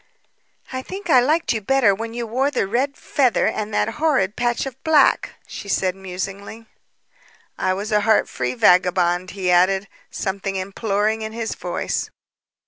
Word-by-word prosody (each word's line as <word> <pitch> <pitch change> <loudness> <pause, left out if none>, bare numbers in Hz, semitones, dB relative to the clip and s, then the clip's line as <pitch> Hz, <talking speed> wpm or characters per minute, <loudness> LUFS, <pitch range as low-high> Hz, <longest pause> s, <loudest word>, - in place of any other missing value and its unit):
"I 260 - -3
think 375 +4 -5
I 255 - +7
liked 305 +5 +1
you 220 - -2
better 235 -1 +3
when 225 +3 -6
you 240 -1 -3
wore 255 +5 0
the 290 - 0
red 260 +8 -1
feather 260 -5 +1
and 215 0 -2
that - - +1
horrid 270 -12 +2
patch 240 +1 0
of 265 -1 -9
black," 310 -4 +3
she 200 - -9
said 185 -2 0
musingly. 195 +4 -7 0.9
"And 185 0 0
was 210 +3 -5
a 210 0 +3
heart 220 +1 +3
free - - -3
vagabond," 180 -4 +3
he 185 -2 0
added, 190 +3 +3 0.2
something 195 0 -3
imploring 205 +3 -1
in 220 0 -5
his 225 -1 -3
voice. - - -3
215 Hz, 160 wpm, -21 LUFS, 195-250 Hz, 0.9 s, I